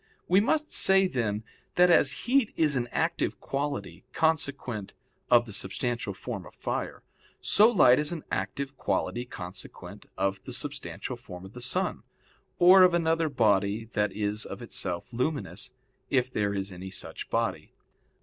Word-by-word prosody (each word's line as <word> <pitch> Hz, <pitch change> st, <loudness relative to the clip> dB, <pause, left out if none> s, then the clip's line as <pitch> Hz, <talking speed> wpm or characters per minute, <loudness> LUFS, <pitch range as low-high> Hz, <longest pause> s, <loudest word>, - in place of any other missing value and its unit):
We 185 Hz, +2 st, +5 dB
must 305 Hz, +8 st, +1 dB
say, 195 Hz, 0 st, +5 dB
then, 115 Hz, -, -1 dB, 0.3 s
that 180 Hz, 0 st, +6 dB
as 145 Hz, -4 st, +3 dB
heat 250 Hz, -1 st, +3 dB
is 150 Hz, -3 st, +3 dB
an 120 Hz, -2 st, 0 dB
active -, -, -1 dB
quality 140 Hz, 0 st, -4 dB
consequent 140 Hz, -9 st, -1 dB, 0.4 s
on 120 Hz, -1 st, +6 dB
the 110 Hz, -, -9 dB
substantial 115 Hz, +5 st, -2 dB
form -, -, -5 dB
of -, -, -14 dB
fire, -, -, -4 dB, 0.4 s
so 215 Hz, +3 st, +5 dB
light 150 Hz, -, +6 dB
is 150 Hz, +2 st, +2 dB
an 170 Hz, -3 st, -5 dB
active 135 Hz, +8 st, -3 dB
quality 120 Hz, +1 st, -1 dB
consequent 90 Hz, -5 st, -8 dB
on 100 Hz, 0 st, +1 dB
the 130 Hz, -, -7 dB
substantial 140 Hz, -2 st, -3 dB
form 95 Hz, -6 st, -10 dB
of 95 Hz, -, -12 dB
the 125 Hz, -, -9 dB
sun, 125 Hz, -, 0 dB, 0.6 s
or 185 Hz, +2 st, +8 dB
of 180 Hz, -1 st, +6 dB
another 165 Hz, -1 st, +1 dB
body 105 Hz, -4 st, +2 dB
that 105 Hz, -2 st, +1 dB
is 105 Hz, +1 st, -2 dB
of 125 Hz, -, -7 dB
itself 90 Hz, -2 st, -3 dB
luminous, 125 Hz, -, -2 dB, 0.4 s
if 130 Hz, -2 st, +1 dB
there 100 Hz, -1 st, 0 dB
is 95 Hz, 0 st, -3 dB
any 95 Hz, +1 st, -8 dB
such 95 Hz, -, -7 dB
body. -, -, -1 dB
125 Hz, 155 wpm, -28 LUFS, 105-160 Hz, 0.6 s, or